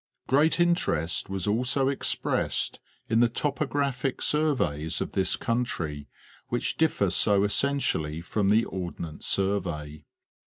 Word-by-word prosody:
Great 150 +6 +3
interest 170 - +1
was 95 -2 -2
also 125 +5 +1
expressed 140 0 0 0.3
in 115 0 +2
the 120 0 +4
topographic 140 -1 -1
surveys 130 - 0
of - - -3
this - - +1
country 85 - -2 0.4
which - - -1
differ - - +1
so 100 -1 +3
essentially 105 - 0
from 95 +4 -1
the 110 +3 +4
Ordnance 85 -4 -6
Sur 100 +1 +2
vey. 75 -4 -7
105 Hz, 120 wpm, -27 LUFS, 85-135 Hz, 0.4 s, the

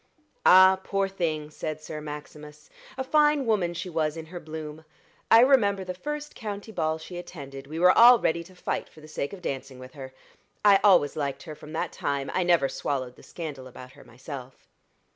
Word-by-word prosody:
"Ah, 190 +1 +7
poor 195 -1 0
thing!" 160 -5 -3
said 155 0 -5
Sir 155 0 -7
Maximus. 150 0 -10 0.3
"A 265 - -2
fine 295 0 +3
woman 190 -7 0
she 170 +2 -5
was 160 -2 -1
in 160 - -7
her 175 +2 -8
bloom. 155 -1 -8 0.5
I 225 - +8
remember 210 -7 +4
the 180 0 -5
first 295 +9 -6
county 210 -1 -7
ball 160 -5 -1
she 175 +2 -8
attended 140 -6 -9
we 155 +3 -7
were 180 +2 +5
all 240 +1 +9
ready 170 -5 0
to 185 +1 -17
fight - - -4
for - - -17
the 155 - -13
sake 150 -2 -4
of 195 -3 -10
dancing 135 -2 -5
with 130 0 -12
her. 135 -2 -9 0.5
I 200 -1 +7
always 180 -8 +5
liked 140 -3 -3
her 155 - -8
from 150 +1 -12
that 160 - -2
time 140 -1 -3
I - - +1
never 170 -6 +3
swallowed 130 -3 -3
the - - -17
scandal 145 -6 -8
about 125 0 -12
her - - -16
myself." 130 +1 -10
160 Hz, 200 wpm, -26 LUFS, 145-190 Hz, 0.5 s, all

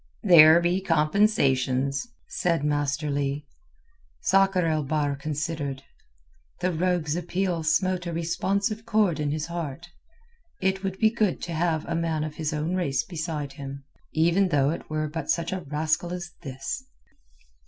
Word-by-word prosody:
"There 165 -4 +8
be 175 +2 +1
compensations," 140 - +2 0.2
said 165 -4 0
Master 145 0 0
Leigh. 140 +1 -1 0.8
Sakr 195 -2 +3
el 155 -1 +1
Bahr 145 0 0
considered. 145 -1 -3 0.8
The 180 +1 0
rogue's 170 -2 0
appeal 175 0 -1
smote 180 +3 +1
a - - -2
responsive 195 +6 -1
chord 210 -8 +2
in 150 -1 0
his 150 +1 -2
heart. 170 -1 -5 0.7
It 190 +1 0
would 190 -1 -2
be 220 +2 +4
good 215 -5 0
to 170 - -4
have 160 -1 0
a - - -3
man 165 -2 0
of 155 -1 -6
his 155 -2 -2
own 155 +3 -2
race 175 - 0
beside 160 - -4
him, 140 -1 -8 0.3
even 170 +5 +3
though 145 -4 +2
it 165 - -6
were 155 0 -1
but 160 +2 -5
such 170 +1 0
a 190 - -2
rascal 155 +3 -1
as 175 -1 -6
this. 135 - -5
165 Hz, 150 wpm, -26 LUFS, 150-180 Hz, 0.8 s, There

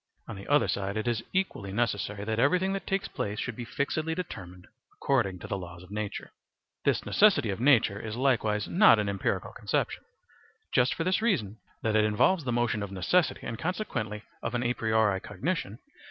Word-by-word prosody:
On - - -6
the 100 - -10
other 145 +1 +4
side 100 +1 -2
it 110 - -2
is 115 -2 0
equally 185 - -1
necessary 105 -2 -1
that 110 +1 -2
everything 180 +9 +3
that 195 - -4
takes 195 +2 0
place 105 +1 -4
should 120 - -3
be 120 - -6
fixedly 155 +6 -2
determined 90 - -7 0.3
according 115 -9 0
to 95 - -4
laws 90 -2 -8
of 90 - -15
nature. 105 -1 -4 0.5
This - - +1
necessity 160 - +4
of 95 - -4
nature 120 -6 +4
is 110 0 -5
likewise 110 -5 +1
not 200 - +6
an 105 -1 0
empirical 100 -1 -2
conception, - - -1 0.7
just 125 +1 +3
for 165 - -1
this 185 +4 +1
reason, 115 - 0 0.2
that 110 -1 +1
it 110 - +5
involves 120 - +2
the 125 - 0
motion 120 -3 +1
of 100 -1 -5
necessity 145 - +1
and 115 0 -5
consequently 120 - -3 0.2
of 115 - -3
a 120 0 +1
priori 110 -4 +2
cognition. 105 - -3
110 Hz, 185 wpm, -28 LUFS, 100-145 Hz, 0.7 s, not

